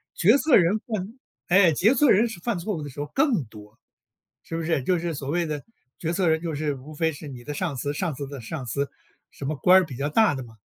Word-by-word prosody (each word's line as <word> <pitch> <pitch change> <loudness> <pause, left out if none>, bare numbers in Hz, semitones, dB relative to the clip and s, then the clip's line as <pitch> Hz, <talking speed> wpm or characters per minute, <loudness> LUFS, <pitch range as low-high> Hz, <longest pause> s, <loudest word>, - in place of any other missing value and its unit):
决 215 +10 +5
策 300 -1 +4
人 190 +4 +3
犯 215 +2 -5 0.3
哎， 180 -2 +5
决 215 - +4
策 275 0 +4
人 215 +5 +5
是 225 -7 -8
犯 210 +1 -2
错 205 +4 -3
误 155 - -5
的 145 - -6
时 135 - -11
候 145 - -3
更 265 - +2
多。 105 0 -15 0.6
是 165 - -6
不 165 - -2
是？ 160 -5 0
就 180 +1 +1
是 170 0 -3
所 140 -1 -6
谓 170 +3 0
的 150 -3 -4 0.4
决 165 0 -2
策 180 -1 +1
人 160 0 +2
就 165 -2 -3
是， 145 -1 -2
无 135 +4 -11
非 160 +1 0
是 150 0 -9
你 125 -3 -9
的 150 - -5
上 165 -2 -2
司， 145 +3 -2
上 170 0 -2
司 140 0 -5
的 140 -2 -8
上 130 +3 -6
司。 140 +5 -2 0.4
什 140 - -8
么 155 +2 -1
官 185 +6 +6
儿 - - -2
比 135 -6 -9
较 140 +2 -1
大 210 +3 +3
的 130 - -5
嘛。 115 -2 -14
160 Hz, 285 characters per minute, -25 LUFS, 140-185 Hz, 0.6 s, 官